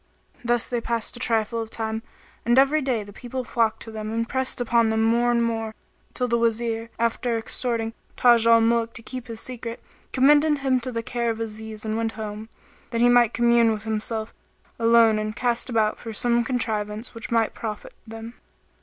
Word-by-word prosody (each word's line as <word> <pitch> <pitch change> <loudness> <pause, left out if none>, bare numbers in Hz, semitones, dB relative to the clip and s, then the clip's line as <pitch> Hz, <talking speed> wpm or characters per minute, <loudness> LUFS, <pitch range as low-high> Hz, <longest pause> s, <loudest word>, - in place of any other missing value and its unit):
Thus 240 0 +1
they 240 -1 -2
passed 230 -1 -2
a - - -8
trifle 230 -1 +1
of 225 - -6
time, 220 0 -3 0.4
and 240 +2 +2
every 275 +3 +5
day 250 -6 -1
the 205 0 -12
people 255 +3 -5
flocked 225 -2 0
to 225 - -8
them 215 0 -5
and 230 +1 -1
pressed 260 +1 -2
upon 235 -1 +2
them 220 0 +1
more 235 +2 +3
and 235 -1 +2
more, 225 -1 -2 0.4
till 250 - 0
the 235 0 +1
Wazir, 230 0 0
after 235 +1 0
exhorting 225 0 -2 0.2
Taj 235 -2 +5
al 230 0 +7
Muluk 230 0 +1
to 230 - -5
keep 255 0 -6
his 225 -2 -6
secret, 235 -2 -6 0.3
commended 295 +3 +4
him 265 -2 +1
to 255 +1 -5
the 230 -1 -3
care 235 0 -1
of 225 -1 -2
Aziz 220 -1 -6
and 220 0 -1
went 225 0 -1
home, 215 0 -6 0.4
that 235 - -2
he 245 - +6
might 240 -2 +4
commune 235 -1 +4
with 215 -1 -3
himself 220 0 -3 0.5
alone 230 -1 +5
and 215 0 -3
cast 240 +1 0
about 220 -3 +1
for 225 - -7
some 235 +2 +2
contrivance 220 -2 -2
which 230 - -7
might 230 -1 +1
profit 215 -2 -6
them. 225 +1 -8
230 Hz, 195 wpm, -24 LUFS, 220-240 Hz, 0.5 s, al